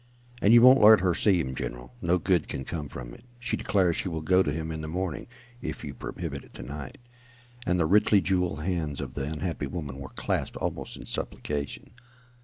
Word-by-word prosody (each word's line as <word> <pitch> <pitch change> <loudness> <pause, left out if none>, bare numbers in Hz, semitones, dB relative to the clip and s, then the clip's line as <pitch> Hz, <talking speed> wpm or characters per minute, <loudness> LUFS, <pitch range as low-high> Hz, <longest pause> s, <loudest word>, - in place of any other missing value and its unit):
"And 100 - +5
you 120 0 +8
won't 130 +2 +8
let 110 -1 +9
her 90 -2 +2
see 95 0 +3
him, 65 -5 -2
general. - - -6
No 85 +1 +2
good 90 -2 +1
can 65 -1 -5
come 75 -4 -4
from - - -8
it. - - -14
She 120 - -2
declares 90 -4 +2
she 95 - -2
will 80 -2 -4
go 90 +3 +4
to 75 - 0
him 80 +2 -3
in 80 -1 -4
the 80 - -5
morning, 90 -1 -3 0.3
if - - -5
you 70 - -5
prohibit - - -6
it - - -19
to - - -7
night," 70 0 -7 0.7
and 90 0 +2
the 85 - +3
richly 105 +4 +5
jewelled 90 -5 0
hands 80 -5 -2
of 65 -3 -5
the 70 -1 -3
unhappy 80 -2 -3
woman 70 -3 -5
were 65 - -7
clasped - - -2
almost - - -4
in - - -10
supplication. 70 +4 -4
80 Hz, 210 wpm, -27 LUFS, 70-95 Hz, 0.7 s, let